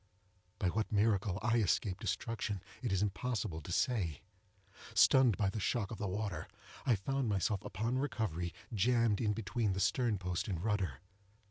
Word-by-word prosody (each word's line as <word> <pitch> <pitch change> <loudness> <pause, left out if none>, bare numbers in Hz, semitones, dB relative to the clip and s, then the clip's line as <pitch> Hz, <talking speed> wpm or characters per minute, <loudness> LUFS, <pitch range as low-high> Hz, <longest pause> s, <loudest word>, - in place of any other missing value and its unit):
By 95 - +1
what 110 +5 -1
miracle 100 -2 +2
I 120 0 +3
escaped 100 -2 +1
destruction, 110 -4 -2 0.2
it 120 - -1
is 95 +1 +2
impossible 105 -4 -2
to 75 - -8
say. 95 - 0 0.7
Stunned 130 -5 +6
by 100 -3 +1
the 110 - -3
shock 105 +1 0
of 115 - -6
the 105 - -1
water, 95 -4 -3 0.4
I 120 - +5
found 135 +5 -1
myself, 100 0 0
upon 115 +6 -1
recovery, 110 - -2 0.2
jammed 115 0 +3
in 105 -2 +2
between 110 -1 -1
the 95 - -2
stern 110 +3 +2
post 90 -2 -2
and 95 -5 -2
rudder. 95 - -1
105 Hz, 160 wpm, -34 LUFS, 95-115 Hz, 0.7 s, Stunned